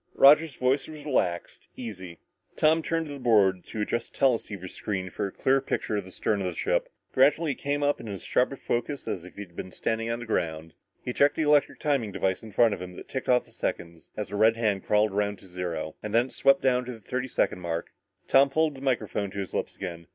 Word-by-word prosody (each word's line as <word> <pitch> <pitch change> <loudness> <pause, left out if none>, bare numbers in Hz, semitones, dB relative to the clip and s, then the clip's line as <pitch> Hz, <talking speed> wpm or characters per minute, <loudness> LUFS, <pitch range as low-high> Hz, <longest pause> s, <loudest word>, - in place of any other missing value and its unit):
Roger's 150 +1 +6
voice 130 +2 +1
was 150 -2 -10
relaxed, 90 - -1
easy. 95 -8 -7 0.4
Tom 160 +1 +4
turned 165 0 -1
to 150 - -8
the 140 - -8
board 100 -7 +3
to 110 - -4
adjust 115 +2 -2
the - - -15
teleceiver 110 -7 +1
screen 95 -1 -4
for 100 - -2
a - - -8
clear 135 +5 +2
picture 120 -4 -2
of 100 -2 -2
the - - -11
stern 100 +2 -1
of 95 - -1
the - - -3
ship. - - 0 0.2
Gradually 145 +4 +4
it - - -6
came 145 +1 -1
up 145 0 +2
in - - -8
as 100 -3 -6
sharp 125 - +2
detail 120 -3 -1 0.2
as 90 - -3
if 90 - -13
he - - -7
had 90 -4 -11
been 95 - -6
standing 115 +3 -2
on 115 - -1
the 120 - -7
ground. 80 -6 -2 0.3
He 125 - -2
checked 140 +3 +4
the 160 - 0
electric 150 -1 +3
timing 140 -8 0
device 95 -1 -1
in 110 - -10
front 115 0 +4
of - - -6
him 90 0 -7
that - - -11
ticked 130 - -4
off 125 -1 +4
the - - -20
seconds, 85 -1 -5
as 105 - -4
a - - -3
red 110 +2 +4
hand 105 -4 0
crawled 105 0 +3
around 100 0 0
to 95 - -16
zero, 90 -4 -4
and 105 - -5
when 120 +1 +5
it 130 - -12
swept 135 0 +4
down 125 -1 +3
to 125 - -5
the 115 - -11
thirty 125 +5 -3
second 105 - 0
mark, 85 -2 -4 0.4
Tom 135 +1 +6
pulled 155 +2 +1
the 135 - -11
microphone 110 -6 -1
to 100 - -10
his 95 -2 -4
lips - - -2
again. 85 -3 -7
110 Hz, 245 wpm, -27 LUFS, 95-135 Hz, 0.4 s, Roger's